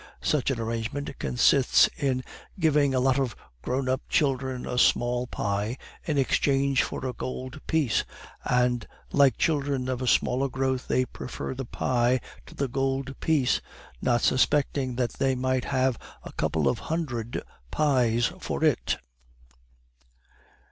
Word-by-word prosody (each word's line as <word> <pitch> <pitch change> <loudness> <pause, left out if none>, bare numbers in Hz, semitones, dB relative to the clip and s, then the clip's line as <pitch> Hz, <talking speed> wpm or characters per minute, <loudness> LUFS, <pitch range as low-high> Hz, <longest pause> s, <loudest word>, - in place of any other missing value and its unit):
Such 145 -4 +1
an 130 -4 -1
arrangement 115 +6 -3
consists 125 +1 +4
in 130 -3 0 0.4
giving 150 -5 +3
a - - +3
lot 130 +1 +3
of 130 -5 -1 0.3
grown 130 - -1
up 130 +2 0
children 130 -3 0
a 125 - -1
small 125 +1 +2
pie 105 +3 -2 0.3
in 155 -4 0
exchange 135 0 +2
for - - -4
a 130 - -2
gold 130 +3 -6
piece; 150 -8 +2 0.4
and, 125 -2 +1 0.2
like 140 -2 +4
children 140 -5 0
of 130 -1 -2
a 130 - -2
smaller 130 +3 +2
growth, 130 -1 -1
they 130 - +2
prefer 125 - -6
the 135 0 -5
pie 125 +1 +1 0.3
to - - -13
the 140 - -1
gold 135 +1 -2
piece, 150 -6 +2 0.4
not 120 -1 +2
suspecting 135 -1 +2
that 120 -2 -1
they 135 -1 +2
might 130 0 0
have 130 -2 +1 0.2
a - - -9
couple 75 -4 0
of 65 - +1
hundred 130 -9 -2 0.3
pies 120 - +2
for - - -3
it." - - +2
130 Hz, 140 wpm, -27 LUFS, 125-140 Hz, 0.4 s, consists